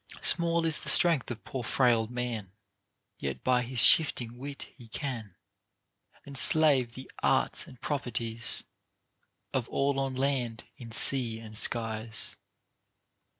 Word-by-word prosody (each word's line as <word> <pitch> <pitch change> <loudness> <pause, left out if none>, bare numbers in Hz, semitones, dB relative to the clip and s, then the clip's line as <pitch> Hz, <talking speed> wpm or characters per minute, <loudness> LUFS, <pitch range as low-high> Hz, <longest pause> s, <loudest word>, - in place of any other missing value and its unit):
Small 170 -1 +2
is 160 -1 +2
the - - -2
strength 165 -7 +4
of 120 -2 -8
poor 130 -2 -6
frail 115 -2 +1
man; 120 -5 -6 0.7
Yet 70 -1 -6
by 125 -1 +1
his 125 +1 -7
shifting 120 -6 +4
wit 140 +1 -8
he 120 -5 -16
can 115 -5 -7 0.9
Enslave 140 -2 +4
the 130 - -11
arts - - 0
and 125 - -15
properties 115 -5 -3 0.9
Of 130 -3 -3
all 140 0 -1
on 135 -1 -3
land, 130 -4 -2
in 115 -3 -12
sea 115 -1 +5
and 110 -1 -12
skies. 110 -1 -2
125 Hz, 125 wpm, -28 LUFS, 115-135 Hz, 0.9 s, sea